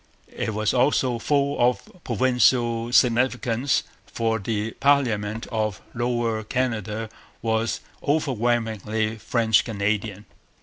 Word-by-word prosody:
It 110 - -2
was 110 0 +1
also 125 -1 +2
full 140 +3 +1
of 120 -4 +2 0.2
political 120 -1 +2
significance; 125 +1 +2 0.2
for 115 -1 -1
the 105 +1 -2
parliament 115 -6 +1
of 110 -3 -1
Lower 120 -2 -1
Canada 110 -3 -2 0.4
was 110 0 0 0.2
overwhelmingly 115 -6 0
French 110 -2 +2
Canadian. 105 -1 -2
115 Hz, 95 wpm, -24 LUFS, 110-125 Hz, 0.4 s, also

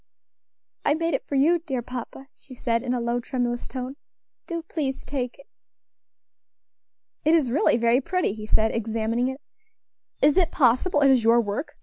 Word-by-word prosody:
"I 290 - +3
made 330 0 -1
it 270 - -2
for 280 - -3
you, 320 +6 +4
dear 270 -7 -4
papa," 250 +2 -7
she 260 - -14
said, 230 -1 0
in 250 0 -1
a - - -1
low, 235 +1 -1
tremulous 240 -1 -2
tone; 260 +1 -6 0.5
"do 335 -2 -4
please 290 -5 -4
take 250 -4 -4
it." 275 - -16 1.8
"It 315 +2 +4
is 280 -7 +2
really 255 -3 +3
very 235 +2 +3
pretty," 365 - -1
he 215 0 -8
said, 220 +1 +2
examining 230 +2 -1
it; 265 +1 -4 0.8
"is 295 +3 +4
it 355 -3 +4
possible 290 +4 +3
it 275 -1 +6
is 255 -3 +3
your 230 +1 +5
work? 220 +6 -3
255 Hz, 170 wpm, -25 LUFS, 235-290 Hz, 1.8 s, it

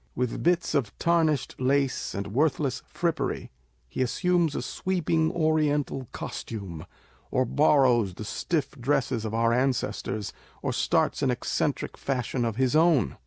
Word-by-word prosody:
With 125 -1 -2
bits 175 -1 +2
of 130 -9 -1
tarnished 165 -4 +1
lace 135 +1 +1
and 100 +1 -4
worthless 145 0 +1
frippery, 170 -2 -2 0.4
he 65 - -4
assumes 170 +4 +1
a - - -2
sweeping 165 -3 0
oriental 150 -5 +1
costume, 95 -8 -6 0.4
or 130 - +1
borrows 125 - +3
the 110 - -7
stiff 150 +6 -1
dresses 125 -3 -1
of 110 0 -3
our 115 0 +3
ancestors, 120 -5 -1 0.3
or - - -1
starts - - +1
an - - +2
eccentric - - -1
fashion 125 -2 -1
of 115 -2 -1
his 130 +3 +1
own. 160 - +3
135 Hz, 135 wpm, -27 LUFS, 115-155 Hz, 0.4 s, borrows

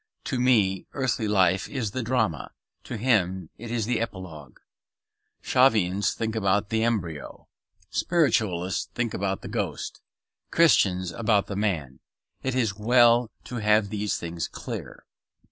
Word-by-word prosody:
To 130 - -2
me 105 -7 +2
earthly 125 -5 -1
life 95 -2 +2
is 120 -7 -3
the 130 - -3
drama; 110 - -1 0.3
to 120 - -5
him 95 -7 +1
it 120 +1 -7
is 115 -2 -1
the 120 +1 0
epilogue. 90 - -7 0.9
Shavians 105 -7 +3
think 110 -1 -3
about 100 0 +1
the 110 0 +1
embryo; 90 -10 -3 0.4
Spiritualists 105 - +1
about 100 -5 -2
the - - -6
ghost; - - -4 0.5
Christians 95 - +3
about 105 -2 +1
the 100 - -6
man. 85 -11 -2 0.4
It 130 -1 -2
is 120 -5 +2
as 100 - -16
well 120 +1 +5
to 125 - -6
have 105 -1 +3
these 105 -1 -2
things 85 -2 -4
clear. - - -8
105 Hz, 135 wpm, -26 LUFS, 95-120 Hz, 0.9 s, well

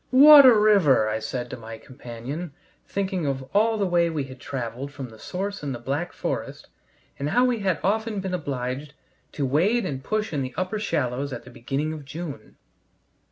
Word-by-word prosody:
"What 285 +1 +10
a 245 - +8
river!" 200 - +4
I 110 +1 -1
said 120 +2 -5
to 130 - -5
my 115 -1 -9
companion, 130 +6 -7 0.3
thinking 190 -5 -2
of 135 -1 -2
all 220 +2 +3
the 200 - +1
way 175 -2 +2
we 155 -3 -2
had 130 -1 -10
traveled 130 +1 -5
from 135 -3 -7
the 110 -1 -15
source 200 - -4
in 140 -2 -3
the - - -4
Black 140 +8 -3
Forest, - - -5 0.5
and 140 +1 -1
how 245 +8 +3
we 245 -3 +1
had 190 -4 0
often 220 +2 0
been 190 -1 -4
obliged 140 -3 -4 0.4
to 140 - -1
wade 185 - +2
and 135 -2 -4
push 215 +3 -2
in 145 - 0
the 130 -1 -5
upper 185 +4 -2
shallows 140 - -1
at - - -6
the 125 - -13
beginning 140 +6 -3
of 155 -2 -8
June. 140 -4 -8
150 Hz, 195 wpm, -25 LUFS, 130-195 Hz, 0.5 s, What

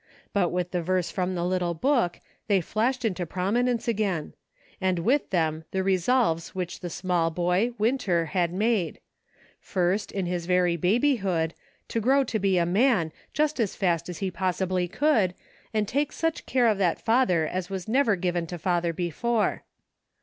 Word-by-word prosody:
But 185 -4 +2
with 180 0 -2
the 180 - -1
verse 180 +1 0
from 185 -1 -1
the 175 0 -1
little 180 -1 0
book, 235 - +1 0.3
they 200 -3 +4
flashed 230 +7 -1
into 185 -5 -1
promi 190 +8 0
nence 245 -2 -1
again; 200 -8 -1 0.5
and 185 -1 +1
with 250 - +1
them 160 -3 0
the 190 0 -1
resolves 190 -2 +1
which 180 -2 -4
the 175 - -5
small 175 -1 0
boy, 180 +8 +1
Winter, 210 -7 +1
had 170 +2 0
made; 200 -3 0 0.6
first, 185 +3 -1
in 195 -2 -2
his 175 -1 -3
very 180 -1 +3
babyhood, 190 - +1 0.4
to 230 - -1
grow 270 +5 +4
to 225 -4 -2
be 195 -2 +2
a 170 - +3
man, 190 -3 +2 0.2
just 300 -1 0
as 220 -5 0
fast 175 -4 0
as 175 - -5
he 190 - -2
possibly 185 0 -1
could, 210 - +2 0.4
and 215 -2 0
take 285 +5 0
such 325 -1 -2
care 255 -2 +2
of 215 -3 +3
that 175 -4 +1
father 225 -9 +2
as 180 +2 -3
was 190 -1 -5
never 235 -2 +3
given 175 -2 -1
to 175 - -5
father 170 0 0
before. 205 +7 -1
185 Hz, 170 wpm, -26 LUFS, 175-225 Hz, 0.6 s, they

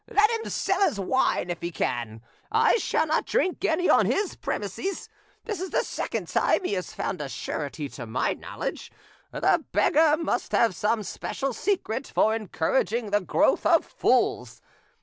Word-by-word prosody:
Let 425 +2 +4
him 455 -1 -3
sell - - 0
his 220 - +2
wine 195 -3 +1
if 175 - -5
he 170 - -2
can; 115 -8 -3 0.3
I - - +4
shall 375 - +1
not 315 0 0
drink 375 -7 0
any 355 -1 +2
on - - +5
his 400 -2 0
premises. 390 +1 -4 0.4
This 420 -6 -4
is 375 - -3
the - - +1
second - - -4
time - - +2
he 360 - -1
has 185 -2 -3
found 185 -5 -3
a 140 - -4
surety 145 +1 -4
to 120 -3 -8
my 125 +4 0
knowledge; - - -6 0.4
the - - +2
beggar 310 0 +4
must 300 -6 -2
have 230 -6 +3
some 210 +5 0
special 270 +7 -4
secret 265 - -1
for 220 - +2
encouraging 220 +2 -1
the 205 0 +3
growth 180 - +2
of - - +4
fools. - - 0
230 Hz, 170 wpm, -26 LUFS, -, 0.4 s, on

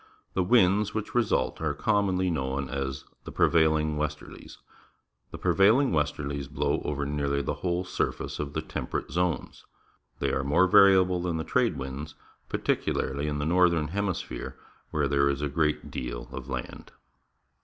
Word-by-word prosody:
The 95 - +1
winds 100 0 +3
which 110 -1 -3
result 120 -8 +1
are 75 -2 -1
commonly 95 0 +1
known 65 -2 -2
as 70 0 -4 0.2
the - - -8
Rnevailing 80 -2 +2
Westerlies. 75 0 -5 0.7
The - - -8
prevailing 110 +8 +4
westerlies 70 -3 -1
blow 75 -1 -1
over 70 -1 -2
nearly 70 -1 -1
the - - -1
whole 90 0 0
surface 90 - -3
of 75 -1 -4
the - - -2
Temperate - - -4
Zones. 90 -1 -2 0.5
They - - -1
are 65 - 0
more 75 +7 +4
variable 95 -1 +5
than 85 -2 -1
the 80 - -2
trade - - +1
winds, 70 +3 -6 0.3
particularly 70 +2 -1
in 75 -1 -2
the 75 - -2
northern 85 -2 +3
hemi 100 0 -1
sphere, - - -7 0.3
where 75 -2 0
there 70 0 +2
is 70 +1 -2
a 75 - 0
great 75 +1 -1
deal - - -5
of 65 0 -7
land. 65 -2 -6
75 Hz, 155 wpm, -27 LUFS, 70-90 Hz, 0.7 s, variable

